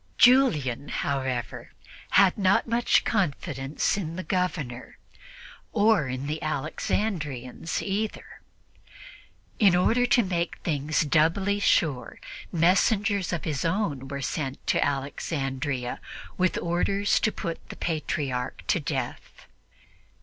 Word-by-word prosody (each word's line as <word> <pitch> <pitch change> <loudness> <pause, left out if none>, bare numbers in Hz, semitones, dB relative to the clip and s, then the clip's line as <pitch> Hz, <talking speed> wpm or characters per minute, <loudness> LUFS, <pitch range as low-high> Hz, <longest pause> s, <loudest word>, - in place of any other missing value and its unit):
Julian, 155 - +4
however, 130 -4 -3 0.4
had 190 -1 +6
not 195 -1 +3
much 235 +1 +2
confidence 150 - -1
in 165 -4 -4
the 185 - -4
Governor, 165 -11 -3 0.8
or 205 - +3
in 130 +2 -4
the 155 +2 -3
Alexandrians 155 - -2
either. 205 +2 -4 1.2
In 195 -5 +6
order 235 +7 +3
to 240 - +4
make 175 -3 -2
things 150 0 0
doubly 165 +7 +2
sure, 150 -9 +1 0.3
messengers 195 +3 +2
of 170 -3 -2
his 145 -4 -2
own 165 -7 -1
were 140 0 -5
sent 135 -3 -3
to - - +2
Alexandria 135 -2 -2 0.4
with 185 0 +1
orders 195 +4 +1
to 215 - +1
put 170 -4 -6
the - - -7
Patriarch 140 -6 -3
to - - +3
death. 140 -5 -5
165 Hz, 110 wpm, -26 LUFS, 140-195 Hz, 1.2 s, had